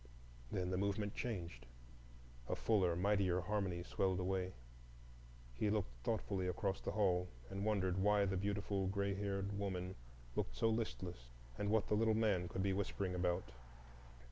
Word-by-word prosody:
Then 90 0 -1
the 90 - +1
movement 100 +1 0
changed, 85 - -4 0.8
and - - 0
fuller, 95 -6 +3
mightier 95 -1 +3
harmony 95 -3 -1
swelled 95 0 +1
away. 95 0 0 1.0
He 105 - +1
looked 105 - 0
thoughtfully 100 -4 0
across 95 +2 -1
the - - -2
hall, 90 -4 +3 0.2
and 95 +1 -2
wondered 95 -4 +1
why 105 0 +4
the 95 0 0
beautiful 100 0 0
gray 100 +1 0
haired 100 0 -2
woman 95 -2 -2 0.4
looked - - -1
so 115 - +3
listless, 90 - -3 0.3
and 100 - -1
what 110 0 +3
the 105 - +2
little 110 0 +3
man 100 -5 +2
could 95 - -2
be 100 -1 +2
whispering 95 -1 -1
about. 90 -5 0
95 Hz, 150 wpm, -39 LUFS, 90-105 Hz, 1.0 s, why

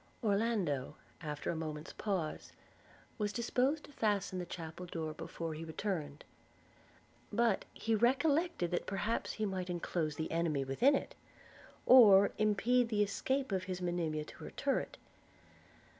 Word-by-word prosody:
Orlando, 200 - 0 0.3
after 150 -3 -3
a - - -3
moment's 155 0 -5
pause, 185 -7 -3 0.7
was 205 -1 0
disposed 255 +6 0
to - - -13
fasten 205 -7 0
the 180 - -5
chapel 170 +1 -7
door 160 -2 -4
before 165 +1 -5
he 155 +1 -6
returned; 160 -3 -4 1.1
but 230 -4 +2
he 225 - -2
recollected 265 - +2
that 175 - -1
perhaps 205 +3 -1
he 215 - -2
might 185 -2 -3
enclose 165 -3 -2
an 160 - -1
enemy 165 -4 0
within 240 - +3
it, - - -3 0.7
or 205 -6 +8
impede 230 +3 +3
the 210 -2 +2
escape 260 +5 -1
of 185 -1 -1
his 185 -1 -4
Monimia 170 -4 -1
to - - -12
her - - -6
turret. - - -2
190 Hz, 140 wpm, -34 LUFS, 160-225 Hz, 1.1 s, or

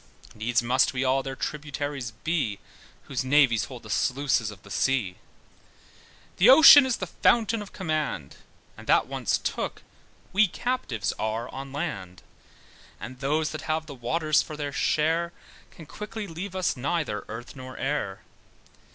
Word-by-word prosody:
Needs 115 +2 0
must 130 +3 +2
we 130 0 -1
all 130 +1 +2
their 135 0 -6
tributaries 145 -3 -4
be, 115 -3 -2 0.5
Whose 130 -1 -3
navies 130 -4 +4
hold 125 -3 -10
the 105 - -8
sluices 130 -4 +1
of 105 -3 -12
the 100 - -14
sea. 115 -9 0 1.2
The 200 +7 +6
ocean 285 0 +10
is 255 - 0
the 185 - -3
fountain 225 +4 +2
of 205 - -9
command, 155 - -3 0.4
But - - -13
that - - +4
once - - -1
took, - - -4 0.5
we 205 +2 +5
captives 185 - -2
are 110 +2 -2
on 135 0 -7
land. 100 - -5 0.8
And 125 +1 -8
those 150 +3 0
that 155 - -5
have 160 0 0
the 150 - -9
waters 155 +5 +1
for 155 - -8
their 145 -1 -4
share, 165 +3 +1 0.4
Can 160 - -13
quickly 210 +6 -7
leave 185 +2 -7
us 185 -1 0
neither 140 - -2
earth 115 +5 -8
nor 130 -1 -9
air. 135 -9 -2
140 Hz, 150 wpm, -26 LUFS, 120-165 Hz, 1.2 s, ocean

